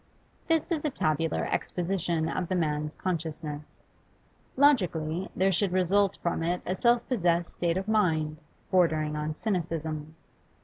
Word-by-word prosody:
This 325 +1 +1
is 315 -3 0
a 305 - +1
tabular 160 - 0
exposition 175 -3 -1
of 180 +1 -2
the 185 - -1
man's 150 -2 -1
consciousness. 155 -4 -4 0.7
Logically, 180 - +2
there 190 +1 +3
should 190 +1 +1
result 185 +2 +2
from 170 -1 0
it 175 +2 0
a 185 - 0
self 235 +4 +2
possessed 175 -8 +1
state 170 0 0
of 190 +1 -3
mind, 160 -8 +1 0.3
bordering 155 -5 +2
on 150 0 -3
cynicism. 160 -5 -3
170 Hz, 135 wpm, -28 LUFS, 155-195 Hz, 0.7 s, there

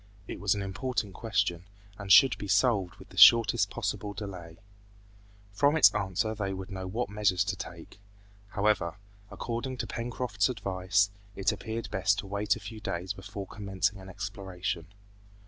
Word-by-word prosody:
It - - -6
was 100 0 +2
an 100 - -3
important 105 +1 -3
question, 95 -6 -1 0.3
and 100 -1 -4
should 135 +5 +8
be 100 - -5
solved 100 -2 +2
with - - -15
the - - -15
shortest 115 -1 +7
possible 100 -1 -3
delay. 90 -5 -8 0.9
From 145 +9 +3
its - - +7
answer 105 +1 -1
they 100 -3 -3
would 95 +1 -8
know 95 -1 -5
what 115 +6 -2
measures 100 -3 +1
to 100 0 -2
take. 90 0 -9 0.5
However, 100 -4 0 0.3
according 120 +2 -4
to 125 - -3
Pencroft's 115 -2 -1
advice, 100 -2 0 0.2
it 100 +2 +1
appeared 110 +2 -5
best 95 +2 +2
to - - -4
wait 100 +2 0
a - - -8
few 110 +2 -8
days 95 -3 -3
before 95 +1 -7
commencing 95 0 -2
an 95 0 -11
exploration. 95 -4 -5
100 Hz, 160 wpm, -29 LUFS, 95-110 Hz, 0.9 s, should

